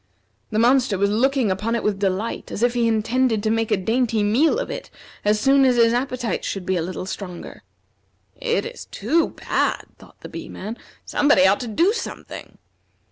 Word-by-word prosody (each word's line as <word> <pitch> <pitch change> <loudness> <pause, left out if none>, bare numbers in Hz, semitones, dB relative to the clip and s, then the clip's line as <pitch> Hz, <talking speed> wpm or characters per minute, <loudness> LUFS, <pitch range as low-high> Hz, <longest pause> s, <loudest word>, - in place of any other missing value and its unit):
The 215 - -2
monster 240 -2 +3
was 200 +1 +1
looking 255 0 +2
upon 215 +5 -1
it 230 - -2
with 205 -2 0
delight, 200 +3 -2
as 220 - -3
if 245 0 +3
he 240 -1 +1
intended 225 0 +1
to 215 - +1
make 225 0 0
a - - +2
dainty 225 +2 0
meal 260 - +3
of - - -3
it - - -6 0.3
as 210 +1 +2
soon 270 +4 +4
as 255 -2 +4
his 230 -1 +4
appetite 245 -4 -2
should 195 -2 -4
be 190 - 0
a 175 - 0
little 185 +2 -5
stronger. 185 - -7 0.7
"It 195 - -1
is - - -8
too 305 +11 0
bad!" - - -1
thought - - -18
the - - -8
Bee - - -8
man. 215 +4 -6 0.3
"Somebody 290 -11 +3
ought 195 +1 +4
to 245 - -5
do 335 - +2
something." 470 - -7
225 Hz, 190 wpm, -22 LUFS, 200-255 Hz, 0.7 s, soon